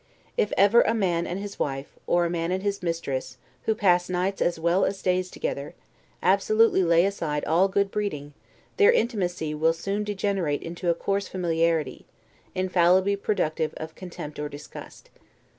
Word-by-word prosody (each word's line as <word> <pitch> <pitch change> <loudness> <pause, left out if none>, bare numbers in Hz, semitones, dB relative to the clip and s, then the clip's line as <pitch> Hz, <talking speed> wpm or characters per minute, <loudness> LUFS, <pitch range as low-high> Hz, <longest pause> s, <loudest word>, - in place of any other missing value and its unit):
If 210 - +1
ever 205 +4 +6
a 225 - +1
man 175 -6 0
and 180 - -3
his 200 0 -7
wife, 135 -1 -3
or 175 0 +3
a - - -1
man 170 0 -1
and 190 +1 -1
his 200 -1 -1
mistress, 140 -7 -3 0.3
who 220 - +2
pass 180 -4 +2
nights 185 +2 -1
as 175 -1 +1
well 170 +3 +2
as 195 - -1
days 185 0 +1
together, 140 -3 -4 0.5
absolutely 215 +2 +4
lay 170 0 +4
aside 165 -7 -2
all 170 +5 +3
good 200 0 0
breeding, 150 -9 -3 0.4
their 415 +2 +7
intimacy 185 - -1
will 160 +2 +2
soon 195 +5 -3
degenerate 195 -7 -1
into 170 +1 -3
a 170 - +3
coarse 195 +3 -1
familiarity, 165 -5 -1 0.5
infallibly 185 +1 +3
productive 165 -6 -1
of 160 0 -7
contempt 170 -5 -8
or 150 0 -3
disgust. 145 +1 -11
180 Hz, 160 wpm, -26 LUFS, 165-200 Hz, 0.5 s, their